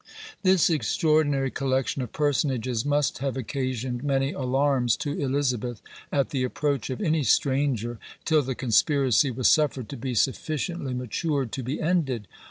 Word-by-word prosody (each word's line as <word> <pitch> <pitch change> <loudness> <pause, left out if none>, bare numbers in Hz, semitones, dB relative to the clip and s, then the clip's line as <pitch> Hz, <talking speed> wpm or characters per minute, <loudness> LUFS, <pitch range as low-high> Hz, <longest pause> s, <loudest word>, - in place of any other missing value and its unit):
This 185 -3 +4
extraordinary 150 -4 +1
collection 135 0 -1
of 125 - -5
personages 130 -5 0
must 145 0 0
have 135 0 -2
occasioned 130 0 -3
many 135 -1 +1
alarms 130 -2 +1
to 145 - -3
Elizabeth, 125 -5 -1 0.3
at 140 -2 0
the 135 -3 0
approach 140 0 -1
of 130 - -4
any 160 -5 +1
stranger, 130 -4 +1 0.3
till 155 -2 +4
the 130 -1 -3
conspiracy 135 +3 +3
was 125 0 +1
suffered 135 -7 +2
to - - -6
be 125 +1 -4
sufficiently 140 - -1
matured 130 +1 -2
to 135 - -4
be 130 +4 -3
ended. 150 - 0
135 Hz, 145 wpm, -26 LUFS, 125-145 Hz, 0.3 s, This